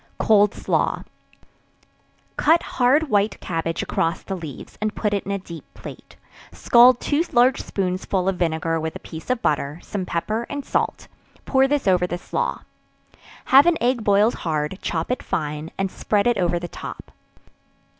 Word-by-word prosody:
Cold 210 Hz, -2 st, +3 dB
Slaw. -, -, -1 dB, 1.3 s
Cut 325 Hz, +3 st, +3 dB
hard 275 Hz, +5 st, +2 dB
white 205 Hz, 0 st, +1 dB
cabbage 165 Hz, -1 st, -3 dB
across 165 Hz, 0 st, -1 dB
the 195 Hz, -, -4 dB
leaves, 160 Hz, -7 st, -9 dB
and 215 Hz, 0 st, -1 dB
put 210 Hz, -2 st, -1 dB
it 200 Hz, -, -1 dB
in -, -, -2 dB
a 200 Hz, -, 0 dB
deep 170 Hz, -4 st, -10 dB
plate, -, -, -11 dB, 0.4 s
scald 245 Hz, 0 st, +5 dB
two 295 Hz, +3 st, +1 dB
large 250 Hz, 0 st, +4 dB
spoonsful 185 Hz, 0 st, -2 dB
of 195 Hz, -, +1 dB
vinegar 165 Hz, -1 st, 0 dB
with 160 Hz, 0 st, -4 dB
a -, -, -6 dB
piece 160 Hz, +6 st, -9 dB
of 250 Hz, -2 st, -1 dB
butter, 145 Hz, +1 st, -1 dB
some 190 Hz, -3 st, -4 dB
pepper 215 Hz, +7 st, -2 dB
and 285 Hz, -1 st, -5 dB
salt; -, -, -2 dB, 0.4 s
pour 265 Hz, 0 st, +3 dB
this 285 Hz, -4 st, -1 dB
over 180 Hz, -1 st, +3 dB
the 175 Hz, -, -3 dB
slaw; -, -, -3 dB, 0.8 s
have 275 Hz, +4 st, +6 dB
an 345 Hz, -2 st, +4 dB
egg 240 Hz, -1 st, +1 dB
boiled 205 Hz, +3 st, +3 dB
hard; 155 Hz, +2 st, -2 dB
chop 165 Hz, +6 st, -2 dB
it 250 Hz, -, -1 dB
fine, 150 Hz, 0 st, -3 dB
and 195 Hz, -1 st, -1 dB
spread 205 Hz, -1 st, 0 dB
it 240 Hz, -4 st, +2 dB
over 175 Hz, -1 st, +1 dB
the 175 Hz, 0 st, -5 dB
top. -, -, -9 dB
200 Hz, 165 wpm, -22 LUFS, 170-240 Hz, 1.3 s, have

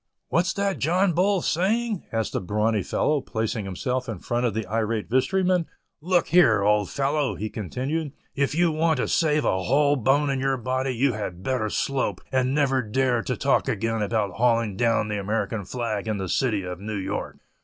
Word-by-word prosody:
"What's 175 Hz, +3 st, +2 dB
that 200 Hz, -1 st, -1 dB
John 175 Hz, +5 st, +2 dB
Bull 190 Hz, +3 st, +2 dB
a -, -, -8 dB
saying," 210 Hz, +4 st, 0 dB
asked 110 Hz, -1 st, -2 dB
a -, -, 0 dB
brawny 105 Hz, +3 st, 0 dB
fellow, 150 Hz, -, 0 dB
placing 110 Hz, -3 st, -3 dB
himself 125 Hz, +7 st, -3 dB
in 110 Hz, -, -4 dB
front 120 Hz, +6 st, -1 dB
of 110 Hz, -, -3 dB
the 110 Hz, -1 st, -2 dB
irate 110 Hz, +2 st, -2 dB
vestryman; 180 Hz, +6 st, +2 dB, 0.3 s
"Look 175 Hz, +2 st, +1 dB
here, 120 Hz, -, +5 dB
old 105 Hz, -1 st, +2 dB
fellow," 140 Hz, 0 st, 0 dB
he 110 Hz, +1 st, -4 dB
continued, 135 Hz, -, -3 dB, 0.2 s
"if 140 Hz, +1 st, 0 dB
you 170 Hz, 0 st, +3 dB
want 160 Hz, 0 st, +1 dB
to -, -, 0 dB
save 150 Hz, -2 st, +2 dB
a 95 Hz, -, +1 dB
whole 145 Hz, +7 st, +3 dB
bone 140 Hz, +3 st, +2 dB
in 135 Hz, -, -1 dB
your 135 Hz, 0 st, 0 dB
body, 130 Hz, +2 st, -1 dB
you 130 Hz, +2 st, +2 dB
had 95 Hz, -4 st, -5 dB
better 130 Hz, -5 st, -1 dB
slope, 135 Hz, +4 st, -1 dB
and 130 Hz, 0 st, +1 dB
never 135 Hz, -3 st, +2 dB
dare 125 Hz, +2 st, +1 dB
to 100 Hz, -, -3 dB
talk -, -, +2 dB
again 115 Hz, +1 st, -1 dB
about 105 Hz, -1 st, 0 dB
hauling 115 Hz, -3 st, +2 dB
down 115 Hz, 0 st, +1 dB
the 105 Hz, -1 st, -2 dB
American 105 Hz, 0 st, -2 dB
flag 110 Hz, -2 st, -3 dB
in 110 Hz, -1 st, -1 dB
the 95 Hz, -1 st, -3 dB
city 110 Hz, -5 st, +1 dB
of 90 Hz, -1 st, -6 dB
New 105 Hz, +1 st, -4 dB
York." 95 Hz, -, -4 dB
125 Hz, 195 wpm, -25 LUFS, 110-150 Hz, 0.3 s, here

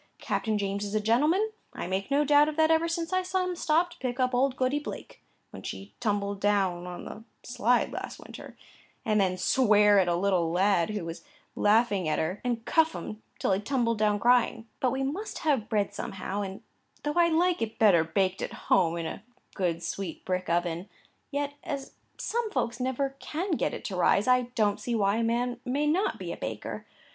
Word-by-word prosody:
Captain 220 Hz, -2 st, -1 dB
James 200 Hz, 0 st, -2 dB
is 205 Hz, +1 st, -4 dB
a -, -, +3 dB
gentleman; 300 Hz, -, +2 dB, 0.2 s
I -, -, -5 dB
make 190 Hz, +4 st, -2 dB
no 285 Hz, +1 st, +3 dB
doubt 295 Hz, +1 st, +5 dB
of 305 Hz, -, -5 dB
that 315 Hz, 0 st, +4 dB
ever 325 Hz, +1 st, +3 dB
since 335 Hz, +1 st, -2 dB
I 370 Hz, -, +3 dB
saw 370 Hz, 0 st, -1 dB
him 365 Hz, -1 st, -2 dB
stop 340 Hz, +1 st, +2 dB
to -, -, -15 dB
pick 250 Hz, 0 st, -3 dB
up 255 Hz, 0 st, +2 dB
old 260 Hz, +1 st, +2 dB
Goody 260 Hz, +3 st, +1 dB
Blake 295 Hz, -, -8 dB, 0.3 s
(when -, -, -9 dB
she 200 Hz, +1 st, -7 dB
tumbled 205 Hz, -3 st, -1 dB
down 190 Hz, -4 st, +1 dB
on 180 Hz, 0 st, -7 dB
the 220 Hz, -, -8 dB, 0.2 s
slide 245 Hz, 0 st, +1 dB
last -, -, -5 dB
winter) -, -, -11 dB, 0.5 s
and 215 Hz, -2 st, +3 dB
then 185 Hz, -1 st, +1 dB
swear 210 Hz, -1 st, +5 dB
at 185 Hz, -, +2 dB
a 175 Hz, -, +2 dB
little 180 Hz, -2 st, +1 dB
lad 185 Hz, 0 st, +2 dB
who 210 Hz, -5 st, -3 dB
was 165 Hz, 0 st, -7 dB, 0.3 s
laughing 205 Hz, -5 st, +3 dB
at 155 Hz, -, +1 dB
her, 175 Hz, +5 st, -2 dB
and 240 Hz, -2 st, -2 dB
cuff 320 Hz, -1 st, +3 dB
him 215 Hz, 0 st, -6 dB, 0.2 s
till -, -, 0 dB
he 190 Hz, -, +2 dB
tumbled 230 Hz, -1 st, 0 dB
down 210 Hz, -1 st, +2 dB
crying; 240 Hz, -1 st, +3 dB
but 255 Hz, -, +2 dB
we 265 Hz, +1 st, -1 dB
must 345 Hz, +11 st, -3 dB
have 260 Hz, -8 st, +1 dB
bread 205 Hz, -2 st, 0 dB
somehow, 195 Hz, +1 st, -4 dB
and 195 Hz, -1 st, -6 dB, 0.4 s
though 295 Hz, -, -1 dB
I 345 Hz, +1 st, +4 dB
like 345 Hz, +2 st, +2 dB
it 225 Hz, -1 st, -3 dB
better 195 Hz, -7 st, +5 dB
baked 185 Hz, +3 st, 0 dB
at -, -, -4 dB
home 170 Hz, -3 st, +2 dB
in 165 Hz, -, -3 dB
a 160 Hz, -, -5 dB, 0.3 s
good 175 Hz, -3 st, -1 dB
sweet 170 Hz, 0 st, -5 dB
brick 185 Hz, 0 st, -2 dB
oven, 175 Hz, +1 st, -1 dB, 0.4 s
yet, 285 Hz, 0 st, -2 dB
as 280 Hz, -3 st, -5 dB, 0.2 s
some 470 Hz, -1 st, -2 dB
folks 235 Hz, -, -2 dB
never 270 Hz, +2 st, -1 dB
can 360 Hz, +6 st, -3 dB
get 315 Hz, -, +1 dB
it -, -, -9 dB
to 195 Hz, -, -3 dB
rise, 200 Hz, +4 st, +3 dB
I 250 Hz, -1 st, +3 dB
don't 210 Hz, -3 st, +2 dB
see 240 Hz, -, -2 dB
why 200 Hz, -1 st, +2 dB
a 230 Hz, -, +1 dB
man 240 Hz, +1 st, 0 dB
may 275 Hz, +4 st, 0 dB
not 345 Hz, +7 st, +1 dB
be -, -, -5 dB
a -, -, -5 dB
baker. -, -, -5 dB
225 Hz, 210 wpm, -28 LUFS, 195-280 Hz, 0.5 s, doubt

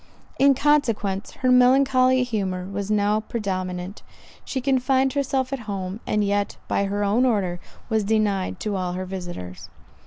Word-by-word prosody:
In 275 Hz, 0 st, +5 dB
consequence, 230 Hz, -9 st, +1 dB, 0.2 s
her 255 Hz, -, +5 dB
melancholy 255 Hz, 0 st, +4 dB
humour 195 Hz, -6 st, -2 dB
was 200 Hz, +1 st, -4 dB
now 210 Hz, 0 st, +2 dB
predominant; 185 Hz, -4 st, -4 dB, 0.4 s
she 265 Hz, -, -3 dB
confined 265 Hz, 0 st, +1 dB
herself 270 Hz, -1 st, -1 dB
at 270 Hz, -, -2 dB
home, 190 Hz, 0 st, -4 dB
and 210 Hz, 0 st, +1 dB
yet, 205 Hz, 0 st, -1 dB
by 200 Hz, -, 0 dB
her 205 Hz, +1 st, -1 dB
own 210 Hz, +5 st, +2 dB
order, 195 Hz, -8 st, 0 dB, 0.3 s
was 220 Hz, -2 st, +1 dB
denied 205 Hz, -2 st, 0 dB
to 210 Hz, -2 st, -2 dB
all 180 Hz, -2 st, -2 dB
her 185 Hz, +1 st, -4 dB
visitors. 175 Hz, -, -7 dB
210 Hz, 150 wpm, -23 LUFS, 190-255 Hz, 0.4 s, In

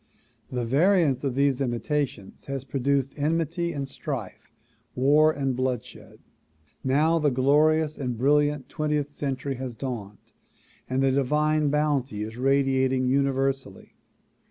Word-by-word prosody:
The 125 Hz, -2 st, -2 dB
variance 150 Hz, +1 st, +3 dB
of 135 Hz, -3 st, -1 dB
these 140 Hz, -1 st, +2 dB
imitations 130 Hz, -3 st, -3 dB
has 135 Hz, -2 st, -4 dB
produced 135 Hz, 0 st, -1 dB
enmity 165 Hz, +3 st, -1 dB
and 140 Hz, -4 st, -4 dB
strife, 135 Hz, -7 st, -6 dB, 0.5 s
war 150 Hz, +4 st, +4 dB
and 135 Hz, -4 st, -2 dB
blood 130 Hz, -2 st, -1 dB
shed. -, -, -14 dB, 0.7 s
Now 155 Hz, +5 st, +2 dB
the 150 Hz, -2 st, +2 dB
glorious 150 Hz, +4 st, +2 dB
and 125 Hz, -4 st, -3 dB
brilliant 145 Hz, +2 st, +2 dB
twentieth 150 Hz, -2 st, -2 dB
century 135 Hz, -2 st, -3 dB
has 130 Hz, -2 st, -5 dB
dawned 110 Hz, -6 st, -7 dB, 0.6 s
and 130 Hz, +1 st, 0 dB
the 135 Hz, -, +3 dB
divine 150 Hz, +3 st, +1 dB
bounty 140 Hz, -7 st, 0 dB
is 110 Hz, +1 st, -7 dB
radiating 130 Hz, 0 st, +2 dB
universally. 135 Hz, -5 st, -1 dB
135 Hz, 125 wpm, -26 LUFS, 130-150 Hz, 0.7 s, war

